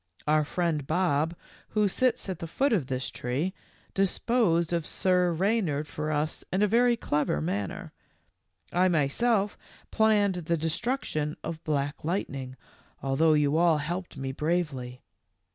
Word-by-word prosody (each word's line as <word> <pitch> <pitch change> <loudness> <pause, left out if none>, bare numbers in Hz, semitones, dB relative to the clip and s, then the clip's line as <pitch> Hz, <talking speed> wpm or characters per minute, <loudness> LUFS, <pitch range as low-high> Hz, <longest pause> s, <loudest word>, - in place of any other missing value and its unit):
Our 155 0 +3
friend 155 -2 -1
Bob, 165 -1 +1 0.3
who 210 -1 +2
sits 250 +5 +1
at 185 -4 -4
the 165 - -5
foot 270 - +1
of 165 -12 +1
this 130 -1 -3
tree, 140 +10 -2 0.4
disposed 195 -3 +2
of 170 -2 -1
Sir 180 -1 +2
Reynard 170 -5 0
for 150 +1 -3
us 155 +1 -1
in 190 +3 +2
a - - +4
very 240 +3 +4
clever 150 - 0
manner. 95 +5 -3 0.8
I 180 +1 +4
myself 195 - +1 0.3
planned 210 -3 +3 0.2
the 170 - +3
destruction 160 - -2
of 160 -1 -5
Black 145 -1 -2
Light 175 +6 -1
ning, 130 -2 -6 0.5
although 145 +4 +3
you 150 0 +3
all 170 -2 +4
helped 170 +3 -4
me 135 0 -3
bravely. 140 -5 -2
165 Hz, 145 wpm, -28 LUFS, 145-190 Hz, 0.8 s, a